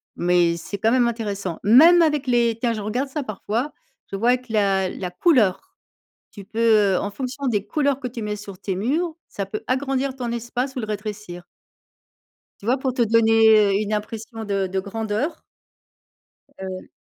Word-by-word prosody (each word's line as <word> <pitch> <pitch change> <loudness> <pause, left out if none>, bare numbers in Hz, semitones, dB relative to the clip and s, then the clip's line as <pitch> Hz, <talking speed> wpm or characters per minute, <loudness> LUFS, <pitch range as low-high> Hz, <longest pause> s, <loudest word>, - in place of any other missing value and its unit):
mais 175 -1 +2
c'est 200 +4 -6
quand 225 +2 +2
même 245 -2 +3
intéressant. 200 -6 -4
Même 320 - +7
avec 300 -3 +1
les 235 -2 +2
tiens, 235 -1 0
je 215 - -4
regarde 245 +7 -2
ça 300 +2 -3
parfois, 220 +5 -3 0.4
je - - -3
vois 245 +4 +3
que 250 -2 -15
la 195 -3 +2
la 180 -2 -5
couleur, 255 - +2 0.6
tu 200 -2 -10
peux, 215 -2 +3
heu, - - +2
en 205 - -3
fonction 265 +4 -5
des 210 -3 -1
couleurs 280 +2 0
que 255 - -4
tu 235 -2 -7
mets 210 0 -3
sur 200 -2 -10
tes 190 -2 -3
murs, 310 - -1
ça 200 - -4
peut 215 +2 -5
agrandir 265 0 -1
ton 245 -2 -4
espace 245 +3 -3
ou - - -1
le 215 - -4
rétrécir. 210 -4 -6 1.2
Tu 210 - -9
vois 255 +3 +3
pour 260 -1 -2
te 245 - -1
donner, 225 0 +4 0.3
heu, 200 - +1
une 210 0 -3
impression 220 +1 -5
de 195 -2 -1
de 190 +1 -2
grandeur? 220 - -3 1.2
Heu 190 -1 -7
225 Hz, 185 wpm, -22 LUFS, 200-255 Hz, 1.2 s, Même